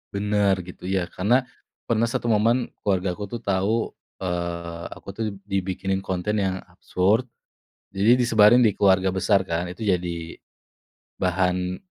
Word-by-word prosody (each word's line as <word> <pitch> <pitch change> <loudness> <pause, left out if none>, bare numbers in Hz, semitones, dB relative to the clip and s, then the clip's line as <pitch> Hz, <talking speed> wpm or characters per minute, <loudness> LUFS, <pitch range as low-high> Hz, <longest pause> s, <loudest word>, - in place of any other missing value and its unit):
Bener 100 -1 +2
gitu 90 - -12
ya, 90 -2 0
karena 105 +7 +2 0.5
pernah 115 -1 +2
satu 120 - -2
momen 115 +3 +2 0.2
keluargaku 95 0 0
tuh 120 - -4
tahu, 100 +1 +1 0.5
eee, 85 -2 -4
aku - - -17
tuh 115 - -2 0.3
dibikinin 95 0 -1
konten 95 +3 -1
yang 95 -1 -1
absurd, 100 +7 +1 0.7
jadi 100 +5 +4
disebarin 115 0 +6
di 110 -3 +5
keluarga 95 -1 +4
besar 95 +1 +3
kan, 85 +1 -1
itu 105 - -16
jadi 85 -5 -2 0.8
bahan 90 0 0
95 Hz, 130 wpm, -24 LUFS, 90-105 Hz, 0.8 s, disebarin